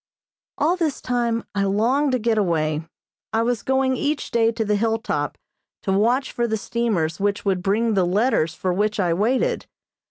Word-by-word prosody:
All 335 +5 +2
this 320 -6 -1
time 235 -2 -1
I 200 -1 0
longed 250 +8 +2
to - - +3
get 225 -1 +1
away. 155 -5 0 0.5
I 225 +1 +2
was 240 -1 0
going 265 0 +1
each 290 +3 -2
day 230 -1 +3
to 225 -1 -2
the 210 0 +1
hill 225 +2 +1
top 145 -9 -3 0.5
to 195 - -1
watch 240 +7 +2
for 240 0 -1
the 220 -1 -1
steamers 205 -9 -1
which 200 +1 -1
would 190 -2 +1
bring 215 +4 +1
the 190 -2 +3
letters 180 -3 +1
for 185 +1 -1
which 210 +3 0
I 175 -3 +2
waited. 255 - 0
220 Hz, 185 wpm, -22 LUFS, 195-245 Hz, 0.5 s, to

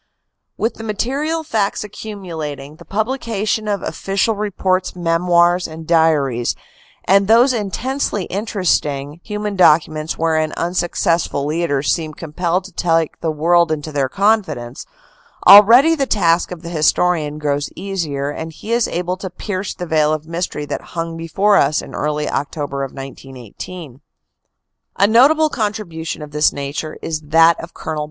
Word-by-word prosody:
With 225 +1 0
the 225 - -9
material 275 +10 -2
facts 215 -9 -1
accumulating, 165 -9 -7
the - - -14
publication 220 -1 -2
of 200 -3 -1
official 195 +3 -1
reports, 190 -3 -1
memoirs 175 +1 +2
and 160 0 -9
diaries, 150 -7 +2 0.5
and 195 +1 +4
those 240 +4 +5
intensely 225 0 -2
inter 200 0 -3
esting 145 -2 0
human 210 -1 -4
documents 155 -3 +3
wherein 160 -1 0
unsuccessful 170 -3 0
leaders 150 -3 0
seem 155 -3 -4
compelled 170 +3 -2
to 195 - -12
take 165 -2 0
the 165 - -2
world 170 +2 +2
into 155 0 -3
their 140 -3 0
confidence, 180 - 0 0.6
already 235 +10 +9
the 280 -4 0
task 170 -6 +2
of 180 -2 -8
the 170 - -6
historian 155 -1 +1
grows 145 -1 -1
easier 160 -7 -3
and 160 +2 -6
he 215 +8 -8
is 235 0 +2
able 180 +1 -2
to 190 0 -6
pierce 190 +1 -5
the 180 - -5
veil 155 -2 +2
of 155 0 -4
mystery 165 -2 -4
that - - -4 0.2
hung 165 0 -3
before 195 +5 +2
us 145 +2 +3
in - - -8
early 150 0 -2
October 140 -1 -3
of 135 - -5
1918. 135 - -10 0.9
A 200 - +4
notable 285 +9 +5
contribution 200 - -4
of 150 - -10
this 150 +1 +3
nature 145 +2 -5
is 155 -1 -3
that 165 +2 +4
of 170 - -11
Col. 155 -1 -4
170 Hz, 145 wpm, -18 LUFS, 155-200 Hz, 0.9 s, already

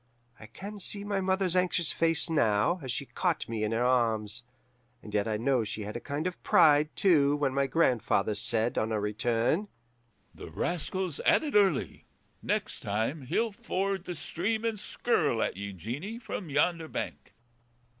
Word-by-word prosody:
I 110 - -11
can 205 - -9
see 200 +1 +2
my 200 -1 -1
mother's 190 -1 +1
anxious 180 -2 +1
face 165 -1 +2
now, 145 - +2
as 130 -3 -4
she - - -2
caught - - -1
me 115 -1 -4
to 105 - 0
her 115 +2 0
arms; 115 -3 +2 0.6
and 105 - -10
yet 105 0 +1
I 110 -1 -1
know 125 +1 +1
she 105 0 -5
had 105 +2 -7
a - - -3
kind 145 +5 -4
of 180 -1 -4
pride, 150 0 +5
too, 145 -7 +4
when 145 -3 0
my 140 0 +1
grandfather 120 -7 +1
said, 110 +3 +2
on 110 +1 -1
our 110 - 0
return, 115 - 0 0.7
'The - - -10
rascal's 180 -1 -3
at - - +3
it 295 - -4
early. 195 -8 +1 0.3
Next - - -2
time 110 +9 -2
he'll 225 - 0
ford 195 -4 -3
the 180 - -5
stream 205 +9 -2
and 225 -2 -1
skirl 160 - 0
at - - -2
ye, 100 +1 -5
Jeanie, 125 - -6
from 225 - -6
yonder 160 +3 +1
bank. - - -6
145 Hz, 175 wpm, -29 LUFS, 115-185 Hz, 0.7 s, pride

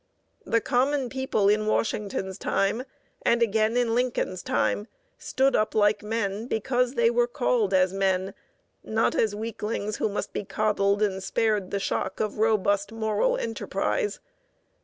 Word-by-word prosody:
The 230 - +2
common 265 +1 +1
people 265 -6 0
in 215 +1 +2
Washington's 200 -3 -1
time, 220 +6 0 0.4
and 235 0 +3
again 220 +1 +1
in 240 -2 +1
Lincoln's 240 -7 -1
time, 210 - 0 0.3
stood 270 +1 +1
up 215 0 +1
like 205 -1 +3
men, 210 0 -2
because 250 +3 0
they 235 0 +3
were 240 0 +2
called 245 -5 0
as 185 -1 +3
men, 190 0 0 0.5
not 220 +1 +1
as 215 -2 +1
weaklings 215 -1 -3
who - - 0
must 205 - -4
be - - -3
coddled 205 0 +1
and 190 -2 -1
spared 210 -1 0
the 200 - -2
shock 195 - -2
of 215 -1 -2
robust 205 -2 +2
moral 225 - 0
enterprise. 415 - -2
215 Hz, 145 wpm, -26 LUFS, 200-235 Hz, 0.5 s, and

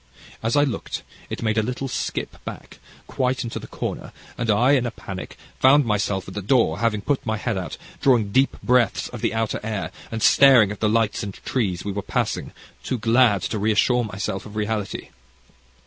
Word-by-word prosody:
As 115 +1 0
I 145 - +5
looked, 135 -5 -3 0.3
it - - -5
made 110 -1 +2
a - - +3
little 125 +4 -3
skip - - -4
back, - - -9 0.3
quite 130 0 -1
into 115 - -4
the - - -10
corner, - - -5 0.2
and 115 -1 -3
I, 120 +6 +4
in 130 -4 +3
a - - -1
panic, 95 -4 -8 0.2
found 140 +2 +6
myself 105 -3 0
at 95 - -8
the 105 - -4
door, 100 -6 +2
having 110 -3 +1
put 140 +5 -1
my 110 -1 -1
head 110 +1 -2
out, 95 -2 -4 0.2
drawing 115 -7 +3
deep 135 +5 +2
breaths 125 -4 +2
of - - -8
the - - 0
outer 115 -1 -1
air, 105 -6 -3 0.2
and 115 -1 -3
staring 130 -7 +7
at 105 - -7
the 110 - +2
lights 110 -1 +1
and 100 -2 -5
tress 95 -8 -2
we 100 - -2
were 100 +1 -3
passing, - - -2 0.3
too 130 - -2
glad 115 -2 +3
to 110 - -2
reassure 110 +4 +3
myself 100 -1 -4
of 105 - -12
reality. 105 -1 -3
110 Hz, 195 wpm, -23 LUFS, 105-125 Hz, 0.3 s, staring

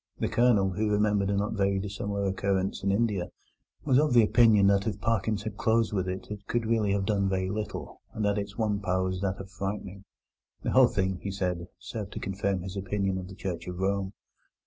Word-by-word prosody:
The - - 0
Colonel, 110 -6 +3
who 105 +4 0
remembered 105 -1 +2
a 100 - +1
not 105 +2 -1
very 100 -2 +1
dissimilar 100 0 -3
occurrence 95 0 0
in 100 - +1
India, 100 -4 +1 0.6
was 135 -2 +4
of 150 -3 +2
the 120 -2 +7
opinion 110 -2 +5
that 100 +1 +3
if 105 - -2
Parkins 110 -2 0
had 105 -1 -5
closed 115 -1 +2
with 95 -2 0
it 95 +2 -6
it 100 -1 -7
could 120 -1 0
really 110 -3 +1
have 100 -1 0
done 100 -1 +1
very 95 0 -1
little, 105 0 -5
and 110 - -2
that 100 0 +2
its 100 -1 -6
one 105 -3 0
power 95 -2 0
was 95 0 -2
that 100 -1 -1
of 95 0 -9
frightening. 100 -1 -5 0.6
The - - -1
whole 130 -1 +7
thing, 95 -4 -1
he 100 - -4
said, 90 -3 -2
served 105 -3 -6
to - - -4
confirm 95 -1 -1
his 95 +1 -6
opinion 95 -1 -1
of 90 - -7
the 95 - -10
Church 90 -3 -5
of 90 -1 -5
Rome. 95 +1 -1
100 Hz, 215 wpm, -28 LUFS, 95-105 Hz, 0.6 s, the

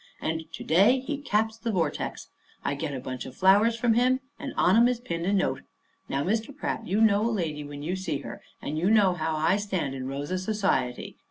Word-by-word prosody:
And 160 0 -3
to - - -6
day 200 +11 +4
he 285 +2 -4
caps 220 -4 0
the 230 0 -2
vortex. 165 -7 -2 0.4
I - - +1
get 140 0 -4
a - - -4
bunch 130 0 -6
of 130 - -11
flowers 205 +5 +5
from 235 0 +2
him, 250 +3 +3 0.2
and 280 -2 -5
on 180 - +4
'em 235 +2 +6
is 250 -1 0
pinned 170 -8 -4
a - - +2
note. 200 -2 +1 0.5
Now, 140 +1 0
Mr. 225 - -2
Pratt, - - -3
you 200 +4 +1
know 210 -1 +4
a 230 - +2
lady 165 -9 -2
when 145 0 -8
you 175 +4 -1
see 185 -6 -2
her; - - -8 0.2
and 155 +2 -2
you 180 +4 +2
know 205 -4 +5
how 160 -2 -2
I 160 +5 +2
stand 190 -9 -2
in 130 -1 -5
Rosa 145 +7 -3
society. 185 - -1
190 Hz, 225 wpm, -27 LUFS, 155-225 Hz, 0.5 s, em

